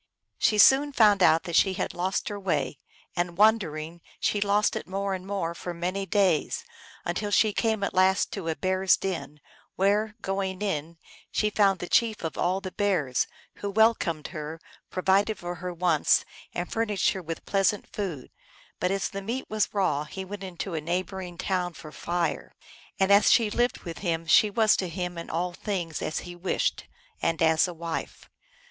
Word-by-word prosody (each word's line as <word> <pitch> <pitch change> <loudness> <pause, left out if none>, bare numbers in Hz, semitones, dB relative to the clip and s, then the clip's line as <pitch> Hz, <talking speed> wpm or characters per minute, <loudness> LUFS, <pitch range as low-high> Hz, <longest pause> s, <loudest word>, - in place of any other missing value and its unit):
She 215 - +3
soon 275 +7 +6
found 210 -5 +5
out 165 -2 +5
that 170 - -4
she 190 +1 +4
had 185 - -3
lost 185 +2 -1
her 205 -1 -5
way, 155 -7 -1 0.4
and, 175 -1 -2
wandering, 170 -7 +2 0.2
she 205 - 0
lost 205 +1 +2
it - - -5
more 195 +1 -2
and 185 0 -6
more 190 -4 -2
for 175 +1 -6
many 185 +3 -2
days, 185 -5 +1 0.4
until 195 +4 -2
she 210 +1 +3
came 220 -2 0
at - - -1
last 190 +1 +3
to 190 -5 -5
a 160 - 0
bear 185 +1 -1
s 190 - +5
den, 150 -6 -4 0.4
where, 210 +3 +1
going 195 0 -2
in, 165 -4 -3 0.3
she 210 -1 +1
found 200 -2 +3
the 175 - -6
Chief 225 -1 +2
of 160 - -3
all 185 +2 0
the 190 -2 -6
bears, 180 -12 0 0.3
who 205 - -4
welcomed 200 -7 +2
her, 155 -1 -6 0.3
provided 195 +3 +2
for 175 0 -5
her 180 0 -3
wants, 175 -3 +2 0.3
and 175 0 -4
furnished 210 -4 +1
her 190 - -4
with 165 -1 -6
pleasant 195 +1 +1
food; 175 -11 -4 0.5
but 180 - +1
as 195 0 0
the 195 - -6
meat 235 +7 -3
was 215 -1 +1
raw 165 -8 0
he 190 +4 -7
went 200 +1 -7
into 185 0 -5
a 160 - -2
neighboring 180 +2 -3
town 180 -2 -1
for 155 - -10
fire. 175 +2 -2 0.4
And 190 +1 +3
as 200 +1 +6
she 225 -3 +4
lived 240 +3 0
with 170 -2 -7
him 165 -3 -1
she 210 +6 +5
was 215 +1 +4
to 185 - -2
him 180 +1 -4
in 170 - -8
all 175 +2 -2
things 175 -4 -3
as 155 - -2
he 175 0 -9
wished, 175 +2 -1 0.4
and 165 -1 0
as 160 +1 +4
a 180 - -6
wife. 165 0 -5
185 Hz, 185 wpm, -27 LUFS, 170-205 Hz, 0.5 s, soon